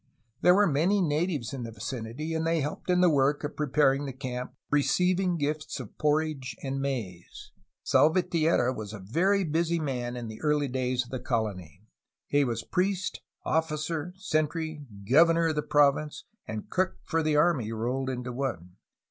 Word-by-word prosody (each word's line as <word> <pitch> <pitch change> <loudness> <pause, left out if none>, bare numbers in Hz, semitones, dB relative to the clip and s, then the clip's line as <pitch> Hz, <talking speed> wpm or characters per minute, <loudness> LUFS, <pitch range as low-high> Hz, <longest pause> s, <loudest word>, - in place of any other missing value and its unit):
There 180 - +6
were 205 +1 +5
many 175 +5 +2
natives 155 - 0
in 135 - -4
the 115 - -5
vicinity, 115 +7 -5
and 160 0 -1
they 165 0 +1
helped 145 +5 -5
in 180 0 +4
the 180 - +6
work 145 +1 +2
of 145 - -4
preparing 145 -1 +2
the 135 - -5
camp, 125 -1 -5 0.2
receiving 180 +5 +2
gifts 150 0 -2
of 120 -6 -9
porridge 150 -3 0
and 135 0 -2
maize. 135 - -5 0.3
Salvatierra 160 -5 +3
was 110 -3 -7
a 110 - -7
very 190 - +2
busy 170 +1 0
man 125 -5 -3
in 120 -1 -5
the 110 0 -9
early 150 -2 +1
days 125 -1 -1
of 120 - -15
the 130 - -3
colony. 105 - -3 0.4
He 145 0 +2
was 115 -4 -2
priest, 190 0 -1 0.2
officer, 160 +1 -1
sentry, 155 -3 -1 0.3
governor 165 +5 +5
of 155 - -1
the 150 - +1
province, 145 0 +2 0.2
and 110 -1 -5
cook 185 0 0
for 165 -1 0
the 155 -1 +1
army 150 -8 +2
rolled 125 +4 -2
into 125 -1 -4
one. 100 -9 -4
145 Hz, 165 wpm, -28 LUFS, 125-165 Hz, 0.4 s, There